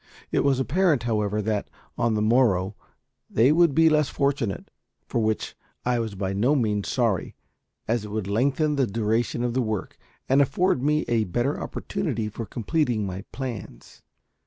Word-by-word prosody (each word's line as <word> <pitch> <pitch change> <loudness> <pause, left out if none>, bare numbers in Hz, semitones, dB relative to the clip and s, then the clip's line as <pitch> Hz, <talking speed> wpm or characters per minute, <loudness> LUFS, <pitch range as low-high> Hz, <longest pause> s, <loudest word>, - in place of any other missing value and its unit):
It - - +2
was 135 -2 +2
apparent, 150 -1 +2
however, 105 -2 0
that 105 -1 -1 0.3
on 115 -2 +1
the 105 - +1
morrow 110 -5 +3 0.6
they 120 +6 +4
would 165 -3 +4
be 165 0 +6
less 150 -3 +3
fortunate; 140 -7 -1 0.3
for 115 - -1
which 110 0 -1 0.3
I 125 -1 +1
was 110 -3 -3
by 95 0 -2
no 120 +9 +2
means 105 -6 0
sorry, 115 -8 0 0.5
as 115 -1 0
it 105 - -7
would 105 -1 -3
lengthen 140 +8 +1
the 135 -3 +2
duration 115 +3 0
of 120 -1 -1
the 130 - +1
work, 110 -4 -3 0.3
and 135 +2 +4
afford 140 +2 +2
me 150 +2 +1
a 115 -2 +1
better 120 +10 -1
opportunity 135 - -3
for 110 +1 -6
completing 120 -3 0
my 95 0 -5
plans. 120 - -7
120 Hz, 165 wpm, -25 LUFS, 105-140 Hz, 0.6 s, be